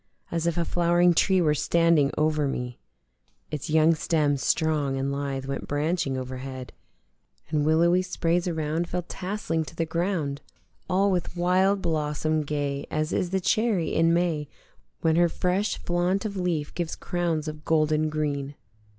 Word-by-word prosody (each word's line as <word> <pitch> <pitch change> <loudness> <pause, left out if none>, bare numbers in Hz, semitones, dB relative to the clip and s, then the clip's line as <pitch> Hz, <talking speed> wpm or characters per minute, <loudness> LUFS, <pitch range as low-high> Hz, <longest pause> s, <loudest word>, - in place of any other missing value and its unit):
As 170 0 -1
if 170 - 0
a 170 - +1
flowering 175 +1 +3
tree 190 +2 +3
were 155 -3 +3
standing 165 -1 +3
over 155 -1 +2
me: 125 -2 -4 0.7
Its 150 +2 -4
young 160 +1 +5
stem 155 -2 +1
strong 145 -1 0
and 135 +1 -1
lithe 140 -1 -3
went 135 0 -4
branching 145 -2 0
overhead 130 0 -6 0.8
And 150 -1 +1
willowy 170 +3 +4
sprays 175 -1 0
around 160 0 -1
fell 180 0 -2
tasseling 180 -3 -3
to 150 - -11
the 165 - 0
ground 160 -4 -2 0.5
All 195 +2 +3
with 180 -1 -2
wild 190 +3 +2
blossom 155 0 0
gay 145 -1 -3
as 155 0 -1
is 180 - 0
the 190 +1 0
cherry 205 -2 +1
in 165 +1 +3
May 170 -4 0 0.5
When 160 0 +2
her 175 0 +4
fresh 185 +5 0
flaunt 180 +4 0
of 205 -2 -3
leaf 175 -5 -2
gives 170 -2 -3
crowns 170 -4 -2
of 150 0 -6
golden 155 -1 +2
green. 145 -2 -2
160 Hz, 155 wpm, -26 LUFS, 150-175 Hz, 0.8 s, young